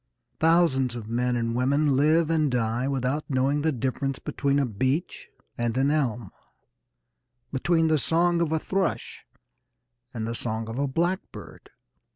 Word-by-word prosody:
Thousands 155 Hz, -7 st, +3 dB
of 115 Hz, -3 st, -7 dB
men 125 Hz, +2 st, 0 dB
and 115 Hz, -1 st, -1 dB
women 140 Hz, +3 st, +2 dB
live 155 Hz, +4 st, +3 dB
and 155 Hz, -3 st, +2 dB
die 120 Hz, 0 st, 0 dB
without 135 Hz, +2 st, -1 dB
knowing 135 Hz, +2 st, +1 dB
the 160 Hz, +1 st, +1 dB
difference 135 Hz, +1 st, -2 dB
between 140 Hz, -1 st, -1 dB
a 140 Hz, -, +2 dB
beech 130 Hz, -, -2 dB, 0.3 s
and 120 Hz, 0 st, -1 dB
an 135 Hz, +2 st, +2 dB
elm, 120 Hz, -9 st, -1 dB, 1.2 s
between 165 Hz, +4 st, +2 dB
the 155 Hz, -1 st, +2 dB
song 170 Hz, +3 st, +2 dB
of 165 Hz, -2 st, 0 dB
a 160 Hz, -, +2 dB
thrush 190 Hz, +3 st, -3 dB, 0.8 s
and 110 Hz, -2 st, -4 dB
the 115 Hz, -, -3 dB
song 110 Hz, -1 st, -3 dB
of 115 Hz, +3 st, -5 dB
a 140 Hz, -, +1 dB
blackbird. 175 Hz, +7 st, -4 dB
135 Hz, 150 wpm, -26 LUFS, 120-155 Hz, 1.2 s, Thousands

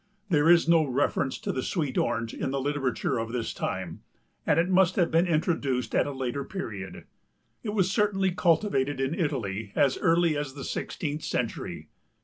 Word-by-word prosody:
There 155 Hz, 0 st, +4 dB
is 170 Hz, -1 st, +6 dB
no 165 Hz, -1 st, +5 dB
reference 135 Hz, 0 st, 0 dB
to -, -, -3 dB
the 130 Hz, -, -2 dB
sweet 150 Hz, -4 st, -2 dB
Orange 115 Hz, -1 st, 0 dB
in -, -, -3 dB
the 135 Hz, +1 st, -1 dB
literature 135 Hz, -4 st, -1 dB
of 115 Hz, 0 st, -3 dB
this 120 Hz, -2 st, -3 dB
time -, -, -4 dB, 0.5 s
and 150 Hz, -, +4 dB
it 170 Hz, -, +2 dB
must 185 Hz, -1 st, +3 dB
have 175 Hz, -3 st, +2 dB
been 165 Hz, +3 st, +3 dB
introduced 150 Hz, -6 st, 0 dB
at -, -, +2 dB
a -, -, -3 dB
later 135 Hz, 0 st, -3 dB
period. 110 Hz, -, -6 dB, 0.6 s
It 210 Hz, -1 st, -4 dB
was 190 Hz, -2 st, +2 dB
certainly 195 Hz, -2 st, +2 dB
cultivated 165 Hz, -6 st, +1 dB
in 135 Hz, +3 st, 0 dB
Italy 110 Hz, -, -2 dB
as 135 Hz, -2 st, +2 dB
early 170 Hz, -2 st, +3 dB
as 145 Hz, -2 st, -4 dB
the 140 Hz, -, -7 dB
sixteenth 150 Hz, -1 st, -3 dB
century. -, -, -3 dB
145 Hz, 175 wpm, -27 LUFS, 130-170 Hz, 0.6 s, is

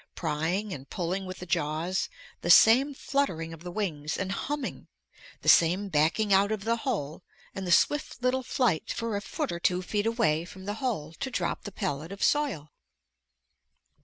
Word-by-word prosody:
Prying 170 Hz, +6 st, -1 dB
and 135 Hz, -1 st, -9 dB
pulling 185 Hz, +2 st, -3 dB
with 185 Hz, 0 st, -6 dB
the 180 Hz, -, -8 dB
jaws, 165 Hz, +3 st, -1 dB, 0.3 s
the 175 Hz, -, -3 dB
same 255 Hz, +9 st, +7 dB
fluttering 180 Hz, -, -1 dB
of 165 Hz, -, -11 dB
the 180 Hz, -, -6 dB
wings 160 Hz, -7 st, -3 dB
and 190 Hz, -1 st, -2 dB
humming, 290 Hz, +7 st, -4 dB, 0.6 s
the -, -, -8 dB
same 180 Hz, +5 st, +5 dB
backing 175 Hz, +6 st, +2 dB
out 200 Hz, +2 st, +4 dB
of 215 Hz, -2 st, -2 dB
the 230 Hz, +2 st, +1 dB
hole 195 Hz, -, -3 dB, 0.3 s
and 190 Hz, -1 st, -5 dB
the -, -, -1 dB
swift 295 Hz, -, +2 dB
little 255 Hz, +1 st, +2 dB
flight 245 Hz, -8 st, 0 dB
for 230 Hz, -2 st, -2 dB
a 200 Hz, -, -2 dB
foot 295 Hz, +6 st, -3 dB
or 170 Hz, -, -4 dB
two 180 Hz, +1 st, +1 dB
feet 205 Hz, +3 st, -1 dB
away 220 Hz, -9 st, +1 dB
from 190 Hz, +2 st, -11 dB
the 205 Hz, -, -2 dB
hole 185 Hz, -, -2 dB
to 265 Hz, -, -2 dB
drop -, -, -2 dB
the 205 Hz, -, -5 dB
pellet 150 Hz, -1 st, -3 dB
of 200 Hz, -, -5 dB
soil. 270 Hz, -, +1 dB
190 Hz, 180 wpm, -28 LUFS, 165-230 Hz, 0.6 s, same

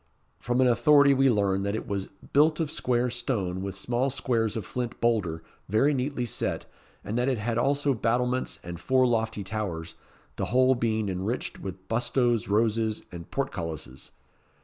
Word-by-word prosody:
From 120 Hz, +6 st, 0 dB
an 130 Hz, -, +5 dB
authority 140 Hz, +4 st, +5 dB
we 135 Hz, 0 st, +4 dB
learn 100 Hz, -4 st, +2 dB
that 100 Hz, +1 st, -1 dB
it -, -, -5 dB
was 100 Hz, -2 st, -2 dB, 0.3 s
"built 155 Hz, +3 st, +4 dB
of 160 Hz, -3 st, -1 dB
square 125 Hz, -2 st, +1 dB
stone, 105 Hz, -7 st, -2 dB
with 95 Hz, 0 st, -4 dB
small 120 Hz, +6 st, 0 dB
squares 115 Hz, -5 st, 0 dB
of 105 Hz, -, -4 dB
flint 125 Hz, +2 st, -4 dB
boulder, 95 Hz, -9 st, 0 dB, 0.3 s
very 135 Hz, +9 st, +3 dB
neatly 130 Hz, -1 st, -1 dB
set; 115 Hz, -, -3 dB, 0.4 s
and 110 Hz, +4 st, -2 dB
that 125 Hz, +2 st, +2 dB
it 130 Hz, -, 0 dB
had 115 Hz, +2 st, -1 dB
also 140 Hz, +2 st, +2 dB
battlements, 125 Hz, +2 st, 0 dB
and 85 Hz, -1 st, -7 dB
four 130 Hz, +6 st, +3 dB
lofty 115 Hz, -3 st, 0 dB
towers, 95 Hz, -5 st, -4 dB, 0.4 s
the -, -, -1 dB
whole 130 Hz, +1 st, +4 dB
being 110 Hz, -3 st, 0 dB
enriched 95 Hz, +6 st, -3 dB
with 95 Hz, 0 st, -8 dB
bustos, 120 Hz, -1 st, +1 dB
roses, 110 Hz, +1 st, +1 dB
and 85 Hz, -2 st, -9 dB
portcullises." 80 Hz, -, -4 dB
115 Hz, 165 wpm, -27 LUFS, 100-125 Hz, 0.4 s, an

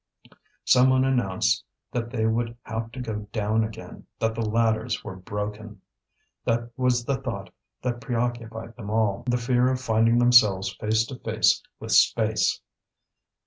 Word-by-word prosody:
Someone 130 Hz, +1 st, +5 dB
announced 120 Hz, -9 st, +1 dB, 0.3 s
that 115 Hz, -1 st, -3 dB
they 115 Hz, -3 st, -1 dB
would 115 Hz, +1 st, -1 dB
have 110 Hz, +1 st, -5 dB
to 130 Hz, -, -7 dB
go 105 Hz, -4 st, -5 dB
down 110 Hz, +1 st, +1 dB
again, 110 Hz, 0 st, -8 dB
that 110 Hz, 0 st, 0 dB
the 115 Hz, -, -4 dB
ladders 110 Hz, +1 st, 0 dB
were 95 Hz, -, -7 dB
broken. 105 Hz, +2 st, -6 dB, 0.6 s
That 120 Hz, +1 st, -1 dB
was 125 Hz, -2 st, +1 dB
the 135 Hz, 0 st, 0 dB
thought 130 Hz, -3 st, -6 dB, 0.3 s
that 120 Hz, -1 st, -2 dB
preoccupied 115 Hz, -1 st, -3 dB
them 105 Hz, -4 st, -7 dB
all, 110 Hz, -2 st, +1 dB
the 125 Hz, 0 st, +2 dB
fear 125 Hz, +1 st, +2 dB
of 130 Hz, -, -1 dB
finding 115 Hz, -1 st, +2 dB
themselves 105 Hz, -6 st, +5 dB
face 110 Hz, +3 st, 0 dB
to 125 Hz, +1 st, -9 dB
face 110 Hz, -4 st, +2 dB, 0.2 s
with -, -, -6 dB
space. -, -, +3 dB
115 Hz, 145 wpm, -25 LUFS, 110-120 Hz, 0.6 s, Someone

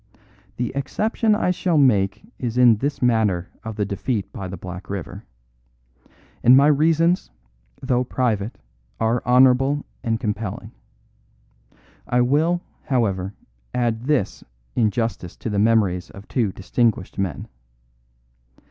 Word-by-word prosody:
The 120 Hz, 0 st, -2 dB
exception 215 Hz, -, 0 dB
I 195 Hz, -4 st, +1 dB
shall 175 Hz, -2 st, 0 dB
make 105 Hz, -, +3 dB, 0.2 s
is 120 Hz, -1 st, -3 dB
in 120 Hz, -3 st, +6 dB
this 140 Hz, +4 st, -2 dB
matter 110 Hz, -7 st, +2 dB
of 110 Hz, -1 st, -6 dB
the 105 Hz, -1 st, -1 dB
defeat 100 Hz, +2 st, -3 dB
by 95 Hz, -, -5 dB
the 95 Hz, +1 st, -7 dB
Black 90 Hz, +2 st, -8 dB
River; 100 Hz, -4 st, -6 dB, 1.2 s
and 125 Hz, +2 st, +7 dB
my 140 Hz, -, +6 dB
reasons, 160 Hz, +4 st, +3 dB, 0.5 s
though 125 Hz, -1 st, +1 dB
private, 115 Hz, -4 st, -1 dB, 0.4 s
are 115 Hz, +2 st, +1 dB
honourable 130 Hz, +3 st, +4 dB, 0.2 s
and 115 Hz, -1 st, 0 dB
compelling. 105 Hz, -4 st, -4 dB, 1.4 s
I 125 Hz, 0 st, +2 dB
will, 155 Hz, +8 st, +2 dB, 0.2 s
however, 100 Hz, -7 st, 0 dB, 0.4 s
add 120 Hz, -1 st, 0 dB
this 135 Hz, -9 st, 0 dB, 0.3 s
in 110 Hz, -3 st, +3 dB
justice 115 Hz, -6 st, -3 dB
to 115 Hz, -, -4 dB
the 100 Hz, -, 0 dB
memories 100 Hz, -5 st, +2 dB
of 100 Hz, +1 st, -13 dB
two 115 Hz, -7 st, 0 dB
distinguished 100 Hz, 0 st, -1 dB
men. 90 Hz, -9 st, -3 dB
115 Hz, 125 wpm, -22 LUFS, 100-135 Hz, 1.4 s, and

